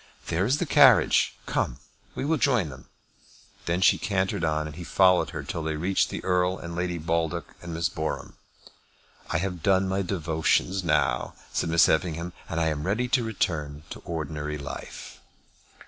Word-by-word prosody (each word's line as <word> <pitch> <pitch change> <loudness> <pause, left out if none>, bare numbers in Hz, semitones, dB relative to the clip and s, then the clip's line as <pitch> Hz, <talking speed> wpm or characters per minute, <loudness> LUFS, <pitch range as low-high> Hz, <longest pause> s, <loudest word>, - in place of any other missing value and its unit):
There 90 +5 +1
is 130 +4 +2
the 175 - -1
carriage. 135 -5 +5
Come; - - -1 0.4
we - - -3
will 160 +2 +2
join 125 - +2
them." 65 - -12 0.8
Then 85 +2 0
she 90 - +5
cantered 95 -2 -1
on, 75 -1 0
and 75 -1 -7
he 90 - -7
followed 90 +1 +4
her - - -5
till 85 - -4
they 80 0 -2
reached 90 +5 +1
the - - -5
Earl 90 0 +1
and 85 0 -7
Lady 90 0 -2
Baldock 85 +1 -2
and 85 - -7
Miss 80 -1 0
Boreham. 80 -4 -4 1.0
"I - - +1
have 90 0 -3
done 95 +2 +3
my 95 +1 0
devotions 90 +1 0
now," 75 -6 +1 0.2
said - - 0
Miss 85 0 +5
Effingham, 85 +1 0 0.2
"and 80 - -2
am 80 -3 0
ready 115 +6 0
to 125 -1 +2
return 75 -9 -2
to - - -7
ordinary 75 -2 -4
life." 70 0 -8
85 Hz, 170 wpm, -26 LUFS, 80-95 Hz, 1.0 s, carriage